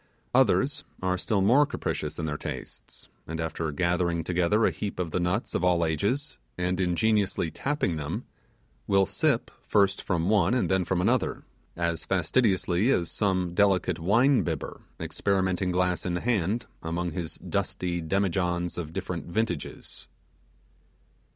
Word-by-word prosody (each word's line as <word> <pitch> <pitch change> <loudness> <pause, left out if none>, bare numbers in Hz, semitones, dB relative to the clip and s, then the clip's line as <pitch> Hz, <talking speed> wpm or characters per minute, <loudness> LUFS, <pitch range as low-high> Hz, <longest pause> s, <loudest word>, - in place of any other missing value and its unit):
Others 135 +2 +3 0.2
are 90 0 +2
still 95 +2 0
more 130 +9 +5
capricious - - -3
in 80 - -2
their 75 -2 -2
tastes; - - -8 0.2
and 80 0 -4
after 80 -1 -2
gathering 85 +1 0
together 90 +6 +2
a - - +3
heap 100 -1 -5
of 90 -3 -2
the 90 - 0
nuts 90 +6 -1
of - - -1
all 90 -2 +3
ages, 100 - -1 0.2
and 90 +1 -1
ingeniously 95 -1 +1
tapping 140 - -1
them, 75 -1 -4 0.6
will 95 -1 +4
first 100 -3 +1
sip - - -8
from 85 -2 +1
one 105 +1 +3
and 125 - +1
then 95 -1 +2
from 90 0 0
another, - - +1 0.3
as 85 -1 -1
fastidiously 95 +1 +2
as 85 -10 +1
some 95 -4 0
delicate 95 -3 +2
wine 120 +10 +4
bibber 80 -4 -4 0.2
experimenting 95 -2 0
glass 90 0 +1
in 90 -1 -1
hand 110 +2 0 0.2
among 85 +1 -2
his 85 -1 -4
dusty 85 -1 -2
demi 95 +4 +1
johns 90 -1 -1
of 80 -2 -6
different 90 -2 -4
vintages. 110 +6 -3
90 Hz, 145 wpm, -27 LUFS, 85-100 Hz, 0.6 s, more